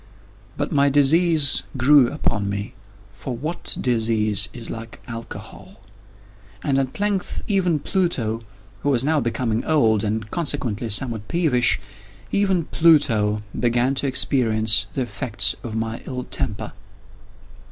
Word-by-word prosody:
But 145 - -2
my 140 -1 +3
disease 150 +1 +4 0.2
grew 130 0 +5
upon 105 -8 -2
me—for 105 +3 -8
what 155 +7 0
disease 110 -4 +1
is 115 -1 -7
like 115 0 -8
Alcohol!—and 100 0 -8
at 135 +4 -3
length 205 -2 -1
even 185 -6 +1
Pluto, 135 - -1 0.4
who 145 - -1
was 130 -2 +2
now 155 0 +2
becoming 115 -2 -1
old, 115 -9 +2
and 110 0 -3
consequently 125 -9 -2
somewhat 110 -1 -1
peevish—even 125 - 0
Pluto 115 -11 +3 0.2
began 120 +2 +2
to 140 +1 -1
experience 110 -5 +2
the 130 - -2
effects 115 -4 -1
of 115 -2 -6
my 115 0 -3
ill 125 -1 -4
temper. 110 -6 -2
115 Hz, 115 wpm, -22 LUFS, 105-145 Hz, 0.4 s, grew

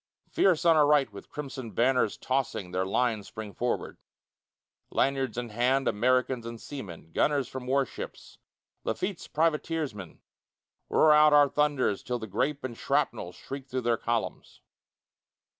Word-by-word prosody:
Fierce 175 -3 +3
on 165 -1 +6
our 150 -2 +5
right 145 -7 +3
with 100 - -11
crimson 135 -5 -6
banners 125 0 +2
tossing 130 -8 -2
Their 95 +1 -1
lines 110 -1 0
spring 110 -2 -8
forward. 120 0 -2 0.9
Lanyards 135 -4 0
in 120 -1 -3
hand, 125 +5 +1
Americans 125 +2 +1
and 115 0 -7
seamen, 95 - -9
Gunners 140 - +1
from 130 -1 -7
warships, 135 -1 -3 0.4
Lafitte's 185 - -3
privateers 160 -2 0
men, 95 -5 -10 0.7
Roar 155 -1 +5
out 150 0 +6
our 145 -1 +7
thunders 145 -9 +1
till 125 -1 -3
the 110 - -6
grape 135 +8 -1
and 125 -3 -4
shrapnel 120 -9 -1
Shriek 135 +8 -8
through 130 0 -2
their 120 -1 +2
columns. 115 0 -3
130 Hz, 140 wpm, -28 LUFS, 115-145 Hz, 0.9 s, our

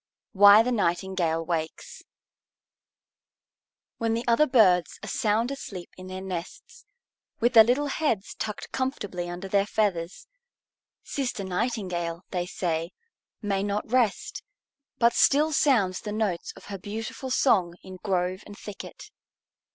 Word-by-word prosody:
WHY 205 +1 +8
THE 250 - -1
NIGHTINGALE 175 -5 0
WAKES 160 -2 -4 2.0
When 225 -1 0
the 235 - -2
other 240 +6 +4
birds 190 -9 +4
are - - -6
sound 225 +4 0
asleep 195 -10 -7
in 185 0 -10
their 185 0 -6
nests, 185 - -7 0.5
with 240 +2 +2
their 225 -2 +10
little 250 +6 +1
heads 275 -8 -1
tucked 210 -1 -5
comfortably 205 -10 -3
under 175 +2 -6
their 200 +1 +2
feathers, 190 -5 -1 0.8
Sister 250 -7 -3
Nightingale, 180 -4 -2
they 180 -2 -2
say, 165 -2 -2 0.5
may 200 -2 0
not 205 +2 -3
rest, 245 -5 +1 0.6
but 235 0 +4
still 305 +3 +4
sounds 225 -12 +2
the 210 - -5
notes 205 -5 -2
of - - -14
her 195 - -5
beautiful 220 +6 -6
song 190 -10 +2
in 185 -1 -10
grove 185 -1 -1
and 205 - -11
thicket. 205 -2 -10
200 Hz, 130 wpm, -26 LUFS, 180-230 Hz, 2.0 s, their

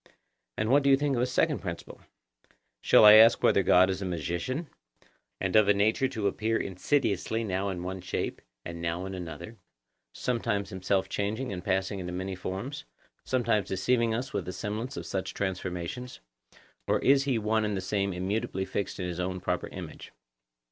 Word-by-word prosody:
And 105 +1 0
what 145 +2 +6
do 140 - +2
you 135 - +6
think 145 -1 0
of 120 - 0
a 125 - +2
second 150 +4 +1
principle? 85 -3 -7 0.8
Shall - - +6
I 105 - +11
ask 115 +2 +8
you - - -1
whether 100 - +5
God 90 0 +5
is 95 +1 -2
a - - -3
magician, 90 - -3 0.7
and 95 0 -1
of 110 -2 +6
a 105 - +5
nature 110 +6 +2
to 110 -6 -4
appear 110 +3 0
insidiously 110 +2 0
now 100 -1 -1
in 90 -2 -4
one 95 +1 -5
shape, 90 - -3 0.2
and 85 0 -6
now 85 +2 -2
in 95 - -6
another—sometimes 90 - -5
himself 95 0 0
changing 105 +3 -2
and 90 -1 -6
passing 95 +1 -1
into 90 -1 -5
many 95 +1 -3
forms, 100 +10 -5 0.4
sometimes 120 -5 +1
deceiving 115 +5 +1
us 125 +3 -4
with 100 -4 -2
the 90 - -5
semblance 105 +7 -4
of - - -5
such 95 -1 -4
transformations; 95 +5 -4 0.7
or - - +3
is 135 0 +3
he 135 -4 +1
one 110 0 +1
and 105 -2 -1
the - - -1
same 100 +1 -1
immutably 95 +1 -2
fixed 100 +1 -4
in 90 - -2
his 90 -1 -5
own 90 0 -2
proper 90 0 -2
image? - - -9
100 Hz, 180 wpm, -28 LUFS, 90-115 Hz, 0.8 s, I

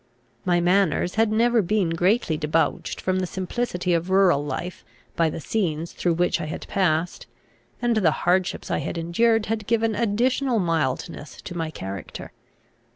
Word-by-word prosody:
My 175 -1 +3
manners 180 -1 +2
had 220 -1 +2
never 235 +1 +3
been 195 -2 0
greatly 175 +1 +1
debauched 155 +1 -1
from 185 0 0
the 185 - -1
simplicity 185 -1 -2
of 170 +2 0
rural 190 -6 +4
life 150 +5 -5 0.3
by 165 -1 +2
the - - -5
scenes 165 -3 -2
through 175 -2 0
which 175 0 +1
I - - -3
had 155 - -6
passed; 175 -3 0 0.6
and 240 -2 +2
the 185 -7 +4 0.2
hardships 180 +1 +1
I - - +1
had - - -4
endured 220 +7 +2
had 215 -2 -3
given 225 -1 +1
additional 240 +4 +1
mildness 155 - -2
to 175 - -7
my 165 -2 -2
character. 95 - -7
180 Hz, 155 wpm, -24 LUFS, 165-215 Hz, 0.6 s, rural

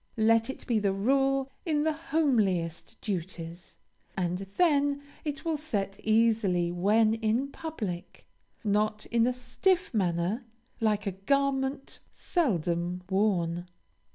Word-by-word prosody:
Let 225 +2 +4
it 265 - -6
be 235 -4 +2
the 200 -2 +1
rule 270 +5 +2
in 305 -4 +1
the 315 0 +2
homeliest 225 - 0
duties, 175 -3 -5 0.4
and 180 -1 0 0.2
then 285 -4 +3 0.2
it 300 +2 -4
will 325 -2 0
set 205 -10 -3
easily 215 -6 +2
when 215 +5 +3
in 225 +5 0
public, 215 - -6 0.4
not 210 0 +1
in 235 0 +3
a - - +3
stiff 350 +8 0
manner, 185 +3 0 0.4
like 215 -3 +1
a 200 - 0
garment 270 +6 0
seldom 180 - -1
worn. 180 -4 +1
220 Hz, 120 wpm, -29 LUFS, 185-275 Hz, 0.4 s, Let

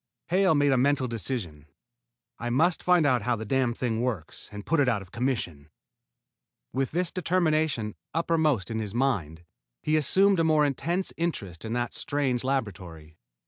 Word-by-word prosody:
Hale 185 -1 +3
made 145 -1 +3
a 130 - +3
mental 140 0 +2
decision. 105 - -4 0.7
"I 120 - -3
must 160 +8 +2
find 180 -3 +4
out 125 -4 +3
how 120 +3 0
the 110 0 -6
damned 125 0 0
thing 115 -3 -1
works 115 -11 -4
and 105 0 -8
put 165 0 +1
it 135 -3 +4
out 105 -5 0
of 90 - -18
commission." 100 - -3 1.0
With 135 -1 0
this 175 +1 -1
determination 155 - 0 0.2
uppermost 160 - +1
in 110 - -2
his 105 -1 -4
mind, 90 - -1 0.4
he 155 - +1
assumed 190 +6 +4
a - - +3
more 155 -2 +4
intense 170 +7 -1
interest 105 - -3
in 110 0 -4
the 120 0 0
strange 135 -4 -1
laboratory. 90 - -4
130 Hz, 165 wpm, -27 LUFS, 110-155 Hz, 1.0 s, find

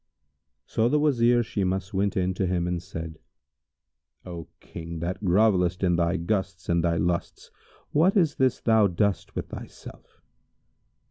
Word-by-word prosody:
So 115 +1 +1
the 150 - +3
Wazir 120 -5 +3
Shimas 95 -3 -2
went 100 +1 0
in 95 0 +1
to 95 0 -1
him 90 -1 0
and 90 -1 -2
said, 80 -3 -7 1.1
"O 85 -2 -7
King, 85 0 -8
that 90 +5 -4
grovellest 90 -2 +2
in 90 -2 +3
thy 85 +1 +1
gusts 95 0 -3
and 85 -1 +2
thy 85 -1 +1
lusts, 85 +1 -2 0.4
what 180 +8 +3
is 165 -6 +3
this 130 -2 +1
thou 110 -3 +4
dost 100 +2 -1
with - - -4
thyself? - - -11
95 Hz, 145 wpm, -26 LUFS, 85-110 Hz, 1.1 s, thou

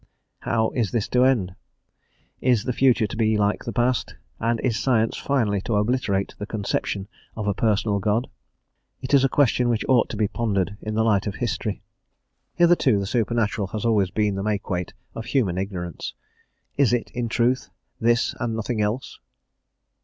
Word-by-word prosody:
How 110 -1 0
is 115 -5 0
this 115 -1 -1
to 125 0 +3
end? 110 -9 +2 0.9
Is 125 -5 +3
the 125 - -1
future 125 -3 +3
to 105 - -5
be 110 -1 +2
like 105 0 0
the 115 - -3
past, 120 +1 0 0.2
and 115 0 0
is 115 -4 0
science 115 -4 +2
finally 110 -8 0
to 110 - -2
obliterate 105 -2 0
the 105 - -5
conception 100 -2 -2 0.3
of 110 - -4
a 100 - +2
personal 105 0 +1
God? 110 +5 0 0.8
It 130 - -4
is 140 -1 +6
a 135 - +3
question 125 -3 +2
which 115 -2 0
ought 125 -3 +3
to 110 - -5
be 105 -1 +2
pondered 100 -3 -1
in 110 0 -4
the 110 - +2
light 105 -2 +2
of 100 - -3
history. 105 -2 -3 0.7
Hitherto 170 -10 +4
the 100 - -1
supernatural 110 -2 0
has 105 +3 -4
always 105 -5 +3
been 105 +1 0
the 95 - -3
makeweight 100 -4 -2 0.2
of 115 - -6
human 100 -10 0
ignorance; 90 -5 -5 0.6
is 140 -4 +4
it, 120 - -1
in 120 -2 -3
truth, 120 +3 +1 0.3
this 115 +1 +2
and 115 -2 -2
nothing 110 0 -2
else? 105 +5 -2
110 Hz, 175 wpm, -24 LUFS, 100-120 Hz, 0.9 s, is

